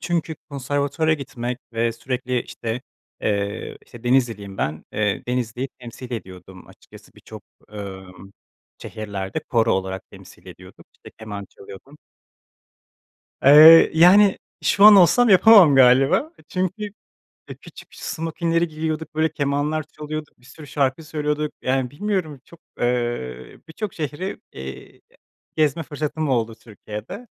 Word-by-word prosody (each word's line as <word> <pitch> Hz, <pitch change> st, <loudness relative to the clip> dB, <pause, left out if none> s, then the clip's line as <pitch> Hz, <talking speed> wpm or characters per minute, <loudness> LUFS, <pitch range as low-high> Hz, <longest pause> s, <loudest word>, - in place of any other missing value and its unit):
Çünkü 170 Hz, -2 st, -2 dB, 0.2 s
konservatuvara 145 Hz, +3 st, -1 dB
gitmek 125 Hz, -3 st, -6 dB
ve 115 Hz, 0 st, 0 dB
sürekli, 125 Hz, 0 st, -3 dB
işte, 115 Hz, +1 st, -5 dB, 0.4 s
eee, 100 Hz, +1 st, -3 dB
işte, 120 Hz, 0 st, -15 dB
Denizliliyim 115 Hz, -6 st, 0 dB
ben. 75 Hz, +1 st, -3 dB
Eee, 105 Hz, -2 st, -1 dB
Denizli'yi 125 Hz, +1 st, -2 dB
temsil 125 Hz, +1 st, -10 dB
ediyordum 95 Hz, -3 st, -9 dB
açıkçası -, -, -18 dB
birçok, -, -, -13 dB, 0.3 s
ımm, 95 Hz, -2 st, -10 dB, 0.5 s
şehirlerde 100 Hz, -3 st, -5 dB
koro 115 Hz, -2 st, +2 dB
olarak 95 Hz, 0 st, -4 dB
temsil -, -, -16 dB
ediyorduk, -, -, -14 dB
işte, -, -, -16 dB
keman 105 Hz, -2 st, -7 dB
çalıyordum. 130 Hz, +10 st, -14 dB, 1.5 s
Eee, 155 Hz, +4 st, +9 dB
yani 190 Hz, +5 st, +6 dB, 0.2 s
şu 200 Hz, -, +3 dB
an 210 Hz, -1 st, +10 dB
olsam 235 Hz, +7 st, +5 dB
yapamam 195 Hz, -5 st, +7 dB
galiba. 135 Hz, -, +4 dB
Eee, -, -, -20 dB
çünkü, 185 Hz, +3 st, -3 dB, 0.7 s
eee, -, -, -7 dB
küçük -, -, -14 dB
smokinleri 165 Hz, +1 st, -2 dB
giyiyorduk, 155 Hz, 0 st, -4 dB
böyle 155 Hz, 0 st, 0 dB
kemanlar 145 Hz, +1 st, -1 dB
çalıyorduk, 155 Hz, 0 st, -8 dB
bir 125 Hz, -, -26 dB
sürü 145 Hz, +4 st, -13 dB
şarkı 140 Hz, +2 st, -1 dB
söylüyorduk. 150 Hz, -1 st, -3 dB
Yani, 130 Hz, -1 st, -1 dB
bilmiyorum 160 Hz, -4 st, -3 dB
çok, 170 Hz, -, -18 dB, 0.2 s
eee, 120 Hz, -, -3 dB
birçok 200 Hz, +5 st, -6 dB
şehri, 160 Hz, +5 st, -5 dB
eee, 65 Hz, 0 st, -10 dB, 0.6 s
gezme 155 Hz, 0 st, +1 dB
fırsatım 150 Hz, +1 st, -4 dB
oldu 115 Hz, -4 st, 0 dB
Türkiye'de. 110 Hz, -, -10 dB
135 Hz, 125 wpm, -22 LUFS, 115-160 Hz, 1.5 s, an